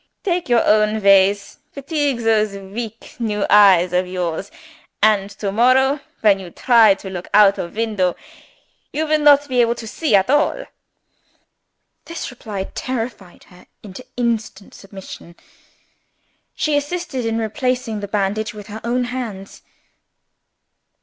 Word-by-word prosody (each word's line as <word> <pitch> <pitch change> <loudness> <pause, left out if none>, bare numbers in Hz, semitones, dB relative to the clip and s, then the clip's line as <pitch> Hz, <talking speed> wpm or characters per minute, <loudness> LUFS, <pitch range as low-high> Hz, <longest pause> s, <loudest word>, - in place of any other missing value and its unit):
"Take 355 - -2
your 240 -1 +3
own 215 0 +2
ways; 200 +1 +3
fatigue 280 -3 -2
those 215 -3 +1
weak 215 +3 -8
new 210 -3 -1
eyes 190 -4 +6
of 180 +1 +1
yours 180 +1 -4 0.5
and 205 -2 +3
to 200 0 -5
morrow, 260 +6 +3 0.2
when 205 -3 +4
you 185 -2 -9
try 225 +1 +4
to 195 0 -9
look 180 -1 -7
out 205 -1 +5
of 170 - -6
window, 210 -5 0 0.8
you 315 +2 -2
will 310 0 +1
not 290 -1 +5
be 250 -3 +2
able 235 0 +1
to 235 - -9
see 255 +2 0
at 195 -1 +3
all." 295 - +1 1.4
This 335 -5 -6
reply 215 -6 -6
terrified 230 -7 -6
her 180 0 -19 0.2
into 205 +4 -10
instant 225 -4 -3
submission. 190 -3 -12 1.2
She 305 -1 0
assisted 290 -2 -3
in 225 0 -1
replacing 230 0 -2
the 205 - -6
bandage 210 +2 -2
with 205 -1 -9
her 220 - -7
own 245 +2 0
hands. 235 -6 -6
220 Hz, 135 wpm, -19 LUFS, 195-250 Hz, 1.4 s, eyes